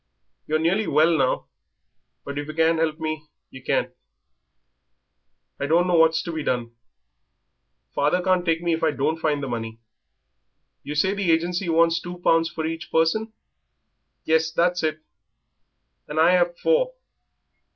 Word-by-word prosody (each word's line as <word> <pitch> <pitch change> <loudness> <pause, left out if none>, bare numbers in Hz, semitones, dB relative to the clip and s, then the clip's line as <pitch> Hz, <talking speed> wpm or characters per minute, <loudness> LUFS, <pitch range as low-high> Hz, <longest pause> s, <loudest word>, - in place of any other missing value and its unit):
"You're 155 - +1
nearly 180 +7 +1
well 165 +2 +3
now. 135 -4 0 0.8
But 140 0 -4
if 145 - -5
yer 155 - -7
can't 165 0 +2
help 160 -1 0
me, 155 -1 -4 0.2
yer 130 - -11
can't. - - -1 1.7
I 140 - -2
don't 170 +4 +3
know 180 - 0
what's 160 -1 +4
to 170 - -5
be 160 -1 -4
done. 120 -4 -2 1.2
Father 180 - +1
can't 185 -1 +2
take 165 -1 0
me 170 -1 +1
if 160 - -2
I 160 - +4
don't 150 +2 -1
find 150 -3 0
the - - -3
money." 115 -2 -5 1.0
"You 150 - -6
say 190 +6 +2
the 200 -3 -2
agency 175 +2 0
wants 165 0 +3
two 175 +1 -7
pounds 165 -1 +2
for 160 0 -4
each 165 0 -5
person?" 165 +8 +1 0.9
"Yes, 160 0 +2
that's 175 +2 +1
it." 155 -1 -2 1.1
"And 150 +1 -3
I've 175 +1 +3
four. - - +1
160 Hz, 150 wpm, -23 LUFS, 155-175 Hz, 1.7 s, what's